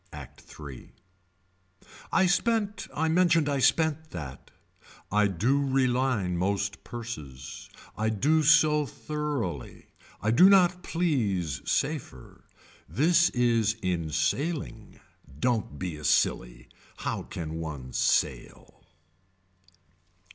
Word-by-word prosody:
Act - - -11
Three. 70 -4 -11 1.2
I 190 - +4
spent 205 +2 0
I 160 +2 -1
mentioned 165 -2 +3
I 140 -1 0
spent 160 +4 +2
that. 70 -5 -8 0.6
I 105 0 +3
do 115 +10 +1
reline 130 -8 +1
most 100 +2 -2
purses. 75 - -8 0.3
I 110 +3 0
do 145 +9 +2
so 150 -1 +4
thoroughly. 145 - -5 0.3
I 110 - 0
do 180 +11 +7
not 180 -2 +4
please 105 - -1
safer. 135 - -3 0.4
This 170 +5 +3
is 115 -3 +1
in 85 -3 -1
sailing. 110 - -2 0.4
Don't 110 - -1
be 85 -1 -4
a 75 - -11
silly. - - 0 0.3
How - - -3
can 80 -1 -6
one 75 -6 -6
sail. - - -1
120 Hz, 105 wpm, -27 LUFS, -, 1.2 s, do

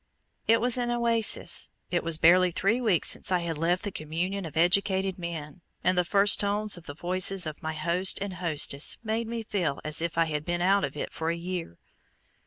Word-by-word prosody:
It 230 +1 +4
was 245 +1 -1
an 240 -1 -1
oasis. 235 -2 +2 0.2
It 175 - 0
was 165 -1 +1
barely 180 +3 +5
three 200 +8 0
weeks 205 -9 +2
since - - +1
I 180 -1 +2
had 170 -1 -3
left 175 +3 0
"the 205 - -4
communion 175 +4 -4
of 160 - -10
educated 190 +2 +2
men," 170 -1 -7 0.2
and 185 - +2
the 180 - +2
first 200 +3 +4
tones 205 +1 +1
of 175 - -14
the 145 - -7
voices 185 +2 0
of 155 -1 -7
my 160 0 -4
host 170 +4 +1
and 200 -1 -4
hostess 160 -5 +1
made 225 +1 -2
me 230 0 -4
feel 180 -10 -2
as 155 +1 -1
if 170 -1 -3
I 165 - +3
had 150 -2 -3
been 175 +2 -2
out 195 +3 +2
of 140 +1 -4
it - - -5
for 160 0 -3
a 170 - -1
year. 170 - -6
180 Hz, 210 wpm, -27 LUFS, 165-200 Hz, 0.2 s, barely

